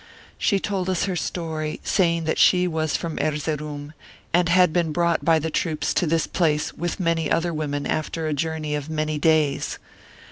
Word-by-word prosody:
She 200 -3 +2
told 190 -2 -2
us 185 -2 0
her 190 -2 -1
story, 160 -3 -3
saying 170 -4 +2
that 160 - -1
she 180 -1 +5
was 160 -2 0
from 165 -2 -4
Erzeroum, 150 -1 -3 0.4
and 175 0 +3
had 180 -2 +5
been 170 -2 +1
brought 170 +1 +1
by 165 -1 +4
the 160 +1 -2
troops 155 -2 -1
to 175 - +1
this 165 +1 +1
place 150 -4 0
with 175 +2 -3
many 165 -3 0
other 170 +1 +1
women 145 -2 -2
after 155 +1 -2
a 155 - 0
journey 155 0 -2
of 150 0 -3
many 155 -1 -1
days. 155 -3 +2
160 Hz, 180 wpm, -23 LUFS, 155-170 Hz, 0.4 s, she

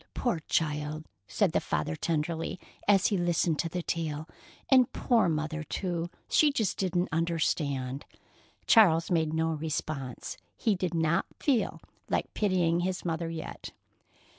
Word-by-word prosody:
Poor 240 -10 0
child!" 150 0 -1 0.2
said - - +1
the - - +2
father 75 +1 -1
tenderly, 165 - -2 0.3
as 200 -2 +5
he 205 - +1
listened 175 -2 +1
to 165 - 0
the 180 +1 -3
tale. 155 -2 -3 0.4
"And 255 -3 +5
poor 230 -7 +2
Mother, 155 0 -2
too; 170 +1 -3 0.2
she 300 -1 +4
just 220 -8 -1
didn't 180 -1 0
understand." 145 -5 -1 0.6
Charles 175 -7 +5
made 160 -3 +2
no 160 +1 +1
response. 150 -4 -4 0.2
He 220 - +2
did 180 -3 -2
not 160 0 +1
feel 265 -6 +1 0.3
like - - -1
pitying 180 -5 +2
his 180 +1 -2
mother 165 0 -1
yet. 165 -1 -7
165 Hz, 140 wpm, -29 LUFS, 155-185 Hz, 0.6 s, as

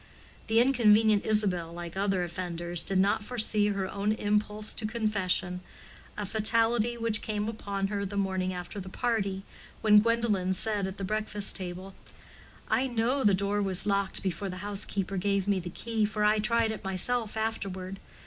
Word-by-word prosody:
The 225 +1 +3
inconvenient 220 -4 +4
Isabel, 190 -6 +1
like 170 0 -7
other 195 -2 0
offenders, 175 0 -3
did 195 - 0
not 200 +2 +2
foresee 215 -3 +1
her 195 -2 -1
own 200 +2 -1
impulse 210 0 0
to 220 - -2
confession, 190 -5 -1 0.6
a 210 - -2
fatality 225 +3 +2
which 225 -2 +1
came 210 -1 -2
upon 200 -3 -3
her 200 -1 -2
the 200 +1 -4
morning 190 -2 -1
after 180 +2 -6
the 190 -1 -7
party, 200 -4 -1 0.4
when 210 -1 +7
Gwendolen 210 -5 +1
said 205 0 -1
at 190 +1 -7
the 195 - -5
breakfast 210 0 0
table, 185 +1 -6 0.7
"I 245 +5 +1
know 245 +3 0
the 205 -3 +5
door 200 +2 0
was 195 -2 +3
locked 200 -1 0
before 190 +1 -2
the 185 - -6
housekeeper 200 -1 -2
gave 200 +1 0
me 200 -2 +2
the 175 0 -6
key, 225 +4 -1
for 210 0 -2
I 210 +1 +4
tried 225 +1 +2
it 220 - -7
myself 215 +4 0
afterward. 195 -4 -3
205 Hz, 170 wpm, -29 LUFS, 190-220 Hz, 0.7 s, when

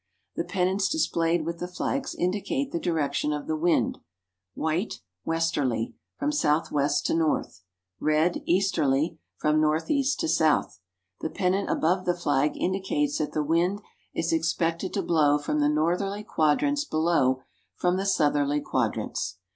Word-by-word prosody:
The - - -1
pennants 190 +1 0
displayed 170 - +1
with 170 0 -4
the 180 - -3
flags 270 +9 -3
indicate 205 +9 -1
the 170 - -1
direction 150 -3 0
of 150 -1 -3
the 155 - -1
wind 165 +2 +1 0.6
white, 160 +7 -1 0.3
westerly 145 -8 0 0.2
(from 295 +1 0
southwest 150 - +1
to - - +1
north); 160 - 0 0.4
red, 155 +3 +2
easterly 165 -4 +1 0.2
(from 155 0 +2
northeast 265 - +1
to 325 - 0
south). 155 - +2 0.4
The 160 - -3
pennant 195 +2 0
above 185 +3 +1
the 175 -1 +1
flag 150 -4 +1
indicates 195 +11 0
that 150 - -2
the 155 - 0
wind 175 +7 +1 0.3
is 165 0 -1
expected 165 +2 0
to 200 - 0
blow 150 -3 +3
from 150 +1 -2
the 145 0 +3
northerly 180 +7 0
quadrants; 255 - +1
below, 155 - +1 0.3
from 180 +1 +1
the 195 +1 -1
southerly 145 -4 +2
quadrants. 90 - -2
165 Hz, 140 wpm, -26 LUFS, 150-190 Hz, 0.6 s, blow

